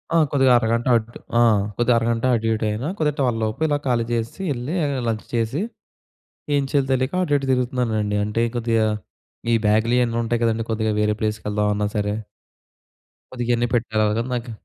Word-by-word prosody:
ఆ! - - +6
కొద్దిగా 135 -3 +4
అరగంట 115 +1 0
అట్ 115 +1 -6 0.3
ఆ! - - +5 0.4
కొద్దిగా 120 0 +3
అరగంట 115 +1 0
అటు 115 0 -1
ఇటు 110 0 -1
అయినా 110 +8 -3
కొద్దిగా 150 -2 0
12 120 -4 +1
లోపు 110 +6 -3
ఇలా 145 -1 +1
ఖాళీ 120 -2 +1
చేసెసీ 115 +10 -3
ఎళ్ళీ 125 +7 -4
ఆహ్, 140 -1 -1
లంచ్ 110 -1 -2
చేసి, 115 +8 0 0.9
ఏం 140 - +2
చెయ్యాలో 140 -2 +2
తెలీక 130 +4 0
అటు 145 -4 +1
ఇటు 135 - -4
తిరుగుతున్నానండి. 115 -5 0
అంటే 110 +3 0
కొద్దిగా 115 -1 +1 0.7
ఈ - - +5
బ్యాగ్‌లు 110 +3 +3
ఇయన్నీ 115 -1 +1
ఉంటాయి 120 +1 -1
కదండీ. 115 0 +1
కొద్దిగా 110 -1 0
వేరే 105 0 +1
ప్లేస్‌కి 105 -1 -2
వెళ్దామన్నా 105 0 0
సరే. 105 0 0 1.2
కొద్దిగా 120 -1 -1
ఇయన్నీ 120 0 +1
పెట్టేలొగా 110 -1 +1
నాకు 120 -1 -3
115 Hz, 170 wpm, -22 LUFS, 110-125 Hz, 1.2 s, ఆ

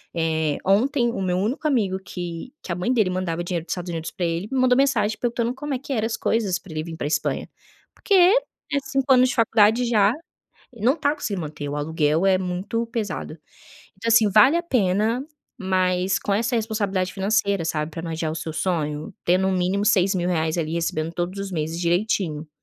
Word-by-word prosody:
Eh, 160 -2 0
ontem 240 +5 +2
o 230 - -4
meu 180 -1 0
único 225 +10 -2
amigo 205 -9 +1
que 175 +4 -6
que - - -6
a - - 0
mãe 180 +7 -1
dele 215 -7 +2
mandava 175 -2 -2
dinheiro 175 -2 -3
dos - - -6
Estados 180 -1 -3
Unidos 165 -1 -4
pra 180 - -3
ele 170 +3 -2
me 265 - 0
mandou 250 -1 +4
mensagem 235 -6 +2
perguntando 235 0 -1
como 290 +1 -4
é 255 - -2
que 275 +1 -5
eram 220 -3 0
as 225 - -3
coisas 200 -5 0
pra 195 - -14
ele 155 - -3
vir 165 0 -8
pra - - -4
Espanha. 150 0 -1 0.5
Porque 405 - -2
é 370 - +3
5 270 0 +2
anos 255 0 +5
de - - -2
faculdade 225 +1 +4
já, 215 -4 +4 0.6
ele 220 -2 -6
não 265 +5 +4
tá 290 -1 +1
conseguindo 205 - -3
manter, 150 -2 -6
o 145 - -4
aluguel 155 +2 +1
é 190 -1 +4
muito 185 +6 -2
pesado. 220 -8 -4 0.6
Então, 225 +4 -5
assim, 225 -2 +5
vale 215 - +6
a 345 - -2
pena, 225 - +1 0.4
mas 185 0 +1
com 200 - -1
essa 230 +4 0
responsabilidade 205 -5 -1
financeira, 200 -3 0
sabe, 155 0 -2
pra 165 - -6
não 165 - -5
adiar 160 -1 -2
o - - -5
seu 160 0 -5
sonho, 155 0 -2
ter, 180 +1 +4
no 190 0 +1
mínimo, 185 +2 0
R$6.000 180 -5 +2
ali, 160 -2 -2
recebendo 165 -1 -1
todos 175 +3 -3
os 195 -1 -5
meses 160 0 -3
direitinho. 170 -3 0
190 Hz, 205 wpm, -23 LUFS, 170-230 Hz, 0.6 s, vale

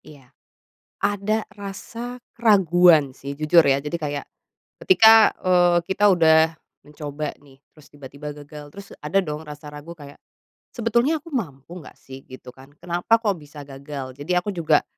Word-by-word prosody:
Iya. 135 -4 -17 0.7
Ada 205 +2 0
rasa 220 +5 -8 0.2
keraguan 175 - +4
sih, 140 +2 -8
jujur, 155 +3 +5
ya. 135 -1 +3
Jadi, 150 +3 -4
kayak 145 -2 -4 0.6
ketika, 225 - +7
eee, 175 -1 +3
kita 205 +3 +2
udah 160 -3 +4 0.3
mencoba 150 0 -6
nih, 135 -2 -20
terus 155 -2 -19
tiba-tiba 145 +1 -9
gagal, 145 0 -12
terus 200 0 -12
ada 150 +6 +1
dong 150 -1 -6
rasa 150 0 -10
ragu 150 +3 -10
kayak 145 -3 -14 0.6
"Sebetulnya 235 +6 +1
aku 330 +2 -14
mampu 170 - -6
nggak - - -14
sih?" 135 0 -12
Gitu, 130 -1 -12
kan. 135 +1 -16
"Kenapa 175 +6 0
kok 205 -3 +1
bisa 150 0 -12
gagal?" 135 -1 -8
Jadi 145 +5 -5
aku 180 +4 -1
juga 155 -3 +2
160 Hz, 150 wpm, -22 LUFS, 145-195 Hz, 0.7 s, ketika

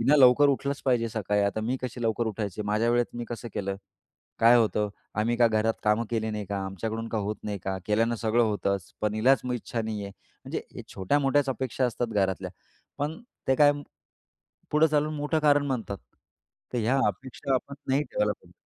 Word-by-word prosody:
"हिनं 140 +6 +5
लवकर 130 +2 +7
उठलंच 140 0 -1
पाहिजे 120 -3 +2
सकाळी. 105 -1 0
आता 100 +2 0
मी 120 +4 -1
कशी 125 -1 -4
लवकर 115 +1 0
उठायचे. 105 -1 -3
माझ्या 105 +3 +1
वेळेत 120 0 +1
मी 120 - -3
कसं 120 0 -6
केलं. 100 -1 -2 0.6
काय 115 +2 +7
होतं. 105 -2 +2 0.3
आम्ही 115 +2 +1
का 120 0 +5
घरात 110 0 +1
कामं 105 +2 +3
केली 110 -1 -1
नाही 105 -1 -3
का. 100 -1 -2
आमच्याकडून 110 +4 -4
का 110 - -1
होत 105 +1 -2
नाही 105 -2 -3
का? 95 0 -1
केल्यानं 115 +3 +2
सगळं 115 +1 +2
होतंच. 100 -3 -1
पण 105 0 0
हिलाच 125 +5 +4
इच्छा 115 -1 -3
नाहीये." 105 -2 -4
म्हणजे - - -8
या - - -6
छोट्या-मोठ्याच 140 +7 +2
अपेक्षा 130 0 -1
असतात 120 0 -2
घरातल्या, 95 -2 0 0.5
पण 150 +6 -2 0.3
ते 135 - +5
काय 145 0 +6 1.0
पुढे 155 +1 +4
चालून 150 +1 +1
मोठं 150 +2 0
कारण 145 -1 +4
म्हणतात. 115 -7 -3 0.7
तर 125 - 0
ह्या 120 +4 +2
अपेक्षा 130 +6 -2
आपण 140 +2 -2
नाही 135 +3 +3
ठेवायला 105 -5 0
पाहिजे. - - -18
115 Hz, 185 wpm, -27 LUFS, 105-130 Hz, 1.0 s, लवकर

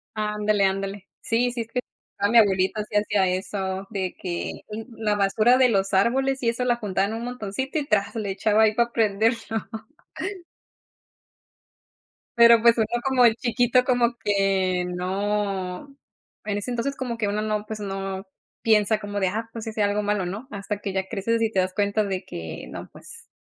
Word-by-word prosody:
Ándale, 210 -1 +1
ándale. 195 0 -2
Sí, 240 +2 +1
sí, 240 - -4
es 225 - -11
que, 250 - 0 0.4
ah, 200 - +2
mi 235 - +5
abuelito 195 -1 +3
sí - - -3
hacía 205 -2 +2
eso 190 +1 -3
de 190 -4 -3
que 175 -2 -4 0.3
la 220 -3 -1
basura 215 +5 +3
de 255 -1 +5
los 195 -3 +1
árboles 265 +7 +2
y 235 - +1
eso 235 +2 0
la 240 -1 +2
juntaba 200 -4 0
en 220 - -4
un 230 +1 -4
montoncito, 250 +4 -3
y 285 - -2
tras, 205 -6 +1
le 210 -3 -2
echaba 215 +2 +2
ahí 215 -1 +3
para 235 +1 +2
prenderlo. 225 +1 +2 3.0
Pero, 235 -1 +7
pues, 235 -1 +6
uno 220 - +3 0.2
como 265 -2 +4
el 225 -2 +5
chiquito 245 +1 +2
como 245 -2 +2
que, 195 -4 +1
no, 190 +3 -2 0.6
en 205 -1 -1
ese 205 +5 -4
entonces 245 +3 -2
como 245 -3 -4
que 210 -2 0
uno 210 +1 -1
no, 215 -1 -2
pues, 215 0 -6
no 195 -1 -4 0.4
piensa 215 -1 +3
como 205 -1 -4
de, 190 - +2
ah, 225 +4 -3
pues, 230 -1 -7
hice 220 -1 -2
algo 205 +1 +1
malo, 205 -2 0
¿no?, 205 +9 -6
hasta 205 0 -4
que 200 -2 -4
ya 190 0 -1
creces 230 +2 -1
y 225 - +2
te 195 - -2
das 185 0 -1
cuenta 205 +1 +1
de 190 -2 -3
que, 80 - -7
no, - - -8
pues, - - -13
210 Hz, 185 wpm, -24 LUFS, 195-230 Hz, 3.0 s, Pero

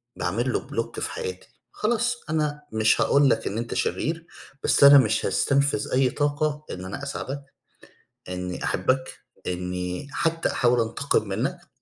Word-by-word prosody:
باعمل - - -1
له - - -2
block - - -3
في - - -3
حياتي. 455 -2 -5 0.2
خلاص 240 +2 0
أنا 150 -1 -1
مش 110 0 +3
هاقول 140 -1 +4
لك 110 - +1
إن 100 - -3
أنت 115 0 -3
شرير، 165 +1 -1 0.4
بس - - +3
أنا 140 0 +10
مش 110 -3 +3
هاستنفذ 140 -5 +1
أي 130 0 +4
طاقة 145 +2 -1
إن 90 0 -6
أنا 100 +9 -6
أساعدك، 140 0 -5 0.9
إنّي 90 0 -4
أحبك، 130 0 0 0.3
إنّي 90 +6 -3
حتّى 165 +1 0
أحاول 125 -1 +3
أنتقم 115 0 0
منّك. 140 - -3
140 Hz, 145 wpm, -25 LUFS, 110-150 Hz, 0.9 s, أنا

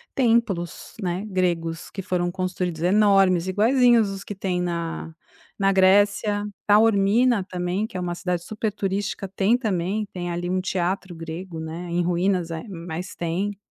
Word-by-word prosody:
templos, 225 -9 0
né, 185 +2 -2
gregos 170 -4 -1
que 195 - -5
foram 175 -1 -1
construídos, 180 -3 -3
enormes, 195 -2 +4
iguaizinhos 230 +1 +4
os 195 0 -6
que 205 - -7
tem 185 -2 -1
na 170 -2 -3 0.5
na 195 0 +3
Grécia. 205 +2 +3 0.2
Taormina 215 +1 +4
também, 185 +3 -2
que 215 - -7
é - - -2
uma 175 -1 -2
cidade 175 -1 -2
super 215 0 -3
turística, 195 0 -2
tem 195 +5 +2
também, 205 -2 -1
tem 175 -1 -4
ali 175 +1 -3
um 185 0 0
teatro 185 -1 -2
grego, 165 +1 -7
né, 165 +2 -6
em 175 +1 0
ruínas, 180 0 0
eh, 160 - -4
mas 175 0 -6
tem. 185 +4 -2
185 Hz, 155 wpm, -24 LUFS, 175-205 Hz, 0.5 s, enormes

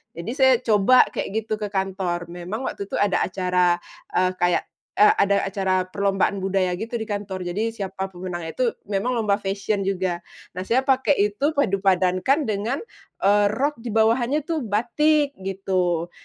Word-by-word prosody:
jadi 170 +7 -5
saya 265 -2 +5
coba 220 +3 +5
kayak 220 +2 -3
gitu 215 - 0
ke 210 - -2
kantor. 190 -3 -2
Memang 180 +8 -5
waktu 200 - -4
itu - - -5
ada 205 -2 +2
acara, 180 -1 +1 0.3
eee, 185 0 +2
kayak, 175 -1 +1 0.4
eee, 210 - +7
ada 200 0 +2
acara 190 -1 0
perlombaan 195 0 0
budaya 185 -2 +1
gitu 230 +2 -5
di - - -2
kantor, 200 -3 -4
jadi 215 +6 -1
siapa 190 -1 -4
pemenangnya 175 -2 -5
tuh 250 -2 +2 0.2
memang 200 +6 0
lomba 210 -3 +2
fashion 200 +1 -2
juga. 185 -2 -1 0.4
Nah, 185 - -3
saya 245 +3 +3
pakai 265 +1 +3 0.2
itu 290 +9 -1
padu-padankan 195 - +2
dengan, 220 - -2 0.4
eee, 205 +1 +4
rok 265 +5 -1
di 240 - -8
bawahannya 240 +6 +2
itu 325 0 -2
batik, 280 +7 +1
gitu. 185 -3 -1
200 Hz, 160 wpm, -23 LUFS, 185-230 Hz, 0.4 s, eee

